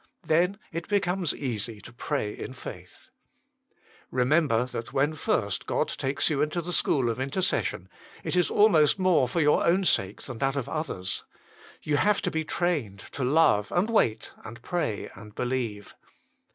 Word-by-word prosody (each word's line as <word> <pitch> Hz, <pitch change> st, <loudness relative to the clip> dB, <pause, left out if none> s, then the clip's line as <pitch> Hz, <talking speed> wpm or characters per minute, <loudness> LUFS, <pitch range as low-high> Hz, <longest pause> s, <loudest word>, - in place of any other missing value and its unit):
Then 180 Hz, +5 st, +2 dB
it 170 Hz, +1 st, -5 dB
becomes 190 Hz, -4 st, +1 dB
easy 115 Hz, -5 st, -4 dB
to 120 Hz, -, -12 dB
pray 120 Hz, -4 st, -2 dB
in -, -, -7 dB
faith. 130 Hz, -, -11 dB, 1.0 s
Remember 125 Hz, -2 st, +2 dB
that 115 Hz, -2 st, -6 dB
when 145 Hz, +3 st, +1 dB
first 105 Hz, -9 st, -1 dB
God -, -, 0 dB
takes 135 Hz, +1 st, -1 dB
you 145 Hz, -2 st, +1 dB
into 155 Hz, +3 st, 0 dB
the 175 Hz, +1 st, -4 dB
school 135 Hz, -7 st, +2 dB
of 115 Hz, -, -5 dB
intercession 135 Hz, -, -1 dB, 0.4 s
it -, -, -2 dB
is 180 Hz, -1 st, +3 dB
almost 170 Hz, -9 st, +5 dB
more 185 Hz, -8 st, +3 dB
for 165 Hz, +8 st, 0 dB
your 150 Hz, 0 st, +4 dB
own 185 Hz, +3 st, +3 dB
sake 95 Hz, -, +1 dB
than 120 Hz, -4 st, -7 dB
that 135 Hz, 0 st, +1 dB
of 140 Hz, -4 st, -2 dB
others. 125 Hz, -, -3 dB, 0.6 s
You 150 Hz, -1 st, +1 dB
have 205 Hz, +5 st, +3 dB
to -, -, 0 dB
bo 160 Hz, -, 0 dB
trained 155 Hz, -, -1 dB
to 140 Hz, -, -3 dB
love, 125 Hz, -7 st, +3 dB
and 195 Hz, +6 st, +1 dB
wait, 115 Hz, -, +1 dB
and 115 Hz, +1 st, -9 dB
pray, 170 Hz, -, -2 dB
and 105 Hz, +1 st, -13 dB
believe. 120 Hz, -5 st, -3 dB
140 Hz, 165 wpm, -27 LUFS, 115-170 Hz, 1.0 s, almost